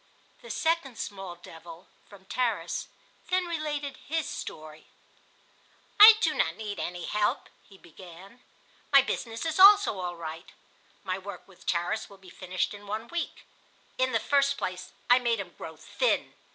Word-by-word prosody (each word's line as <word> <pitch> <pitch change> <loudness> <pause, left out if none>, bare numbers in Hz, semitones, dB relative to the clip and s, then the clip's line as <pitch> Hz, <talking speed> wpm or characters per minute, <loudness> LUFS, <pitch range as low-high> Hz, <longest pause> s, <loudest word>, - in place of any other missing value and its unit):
The 485 - -12
second 320 -7 -1
small 195 -5 -6
devil 170 0 -13 0.2
(from 195 -2 -16
Tarras) 245 +3 -2 0.4
then 370 0 +1
related 295 -5 -3
his 320 +1 -3
story. 155 0 -8 1.1
"I 435 +1 +12
do - - +2
not - - 0
need 210 -2 -6
any 175 0 -4
help," 210 0 -1 0.2
he 195 - -16
began. 185 +6 -14 0.5
"My 275 -1 +8
business 230 0 -4
is 320 +2 -2
also 400 - +7
all 175 -1 -4
right. 165 0 -8 0.5
My 185 -1 -3
work 195 -2 -9
with 195 -2 -19
Tarras 175 0 -1
will 200 - -14
be 190 -2 -16
finished 185 +1 -3
in 205 0 -11
one 220 +3 -5
week. 345 -1 -5 0.5
In 260 0 +2
the 225 - +2
first 280 +3 +2
place 185 0 -5 0.2
I 245 +1 +6
made 235 -3 0
him 180 -4 -7
grow 160 -1 -9
thin. - - -1
205 Hz, 155 wpm, -28 LUFS, 180-280 Hz, 1.1 s, I